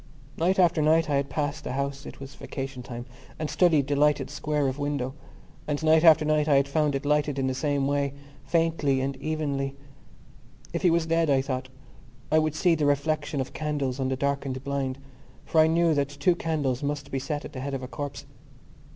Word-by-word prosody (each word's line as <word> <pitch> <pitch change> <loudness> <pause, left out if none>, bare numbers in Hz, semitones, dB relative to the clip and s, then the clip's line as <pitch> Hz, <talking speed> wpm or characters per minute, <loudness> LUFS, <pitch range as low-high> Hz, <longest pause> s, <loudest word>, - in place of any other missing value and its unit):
Night 180 +4 +1
after 175 -3 +4
night 155 +1 +3
I - - +3
had 140 0 -1
passed 150 0 -2
the - - -4
house 140 +1 -3
(it - - -10
was 135 0 -9
vacation 135 -1 -6
time) 120 0 -7 0.3
and 155 -1 -3
studied 160 -6 +3
the 145 +1 -1
lighted 150 +1 +2
square 150 -2 -1
of 130 +2 -3
window: 140 -3 -2 0.5
and 150 +1 -2
night 160 0 +5
after 160 -2 +7
night 155 0 +2
I 145 - +4
had 140 0 +3
found 150 0 +1
it 135 - -3
lighted 150 -1 +1
in 135 - 0
the 130 - 0
same 140 +1 0
way, 140 0 0 0.3
faintly 165 -5 +1
and 135 +1 -2
evenly. 140 -2 -2 1.0
If - - -1
he 180 - +4
was 165 -1 +2
dead, 165 -1 +1
I 135 -1 +3
thought, 130 -1 -3 0.6
I 155 - +5
would 155 -1 0
see 175 +1 +3
the 150 -3 +1
reflection 145 +1 0
of 130 - -6
candles 145 -4 -2
on 130 -1 0
the 130 - 0
darkened 140 -1 -2
blind 140 -2 -2 0.5
for 160 - +4
I 155 - +5
knew 165 0 +3
that 140 -2 0
two 145 +5 +1
candles 145 -7 -1
must 145 0 -3
be 135 - -1
set 145 +2 -4
at - - -9
the 130 - -6
head 140 0 -3
of 130 - -5
a - - -5
corpse. 145 +1 -6
145 Hz, 210 wpm, -26 LUFS, 135-155 Hz, 1.0 s, after